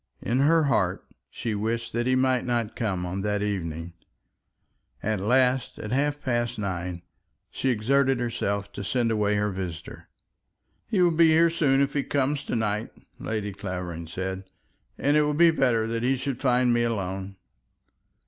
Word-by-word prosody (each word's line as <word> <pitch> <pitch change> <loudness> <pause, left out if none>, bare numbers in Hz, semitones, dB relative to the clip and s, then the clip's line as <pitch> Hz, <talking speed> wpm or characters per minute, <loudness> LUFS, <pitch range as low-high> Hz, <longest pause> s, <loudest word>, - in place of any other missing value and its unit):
In 125 +3 0
her 160 +3 +4
heart 95 -10 +1 0.2
she 115 - -4
wished 115 +3 -2
that 120 +1 0
he 130 - +3
might 130 -1 +2
not 120 -3 -1
come 95 -6 -2
on 95 +2 -3
that 105 0 -1
evening. 85 -4 -3 1.1
At 110 -1 0
last, 125 +4 +2
at 105 - -6
half 145 +3 +1
past 120 -1 -1
nine, 90 -3 -4 0.5
she 135 - -1
exerted 130 +3 +2
herself 100 -4 -2
to 100 - -6
send 120 +2 0
away 105 -1 +1
her 105 0 0
visitor. 90 -4 -7 0.8
"He 200 -6 +2
will 175 - +4
be 165 0 +6
here 165 +1 +5
soon, 140 -5 +2
if 140 0 +1
he 145 - +1
comes 140 +1 -1
to - - -2
night," 105 -1 -1 0.3
Lady 105 -2 -3
Clavering 90 -4 -5
said, 95 +3 -4 0.5
"and 145 +2 +2
it 150 - +5
will 150 0 +1
be 170 +2 +6
better 125 -7 +2
that 115 0 -2
he 130 +3 +2
should 130 -1 -4
find 125 -2 +3
me 120 - +2
alone." 95 -4 -2
115 Hz, 165 wpm, -26 LUFS, 100-135 Hz, 1.1 s, be